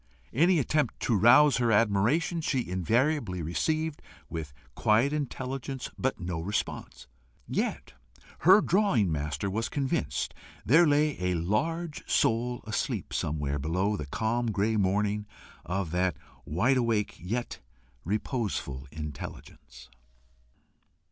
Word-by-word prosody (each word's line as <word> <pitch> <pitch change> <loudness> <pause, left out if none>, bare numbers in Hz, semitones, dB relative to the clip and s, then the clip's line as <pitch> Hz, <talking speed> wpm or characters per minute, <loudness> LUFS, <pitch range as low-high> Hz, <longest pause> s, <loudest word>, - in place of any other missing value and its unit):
Any 170 +7 +4
attempt 150 +1 0
to 120 - +1
rouse 125 +8 +6
her 120 -2 +2
admiration, 115 - +2
she 130 -5 -1
invariably 95 - 0
received 155 - -1 0.3
with 80 -3 -5 0.2
quiet 115 +7 +2
intelligence 135 -2 -4
but 130 0 -1
no 90 -2 -3
response. 100 +5 -4 0.4
Yet - - -2 0.5
her 190 +5 +7
drawing 175 - +2
master 75 +4 -2
was 110 +4 -2
convinced 135 -2 -1 0.3
there 160 +8 +6
lay 150 -2 +2
a 90 0 +1
large 155 - -1
soul 120 +2 +1
asleep 110 0 -3
somewhere 75 -1 -1
below 90 +8 0
the 75 -7 -5
calm 115 +9 -1
grey 110 +1 +1
morning 105 +1 0 0.4
of 95 -2 -2
that 90 -2 0 0.3
wide 120 - +2
awake 115 -4 0
yet 115 +8 -4 0.4
reposeful 100 - -3
intelligence. 70 -4 -9
110 Hz, 115 wpm, -28 LUFS, 90-135 Hz, 0.5 s, her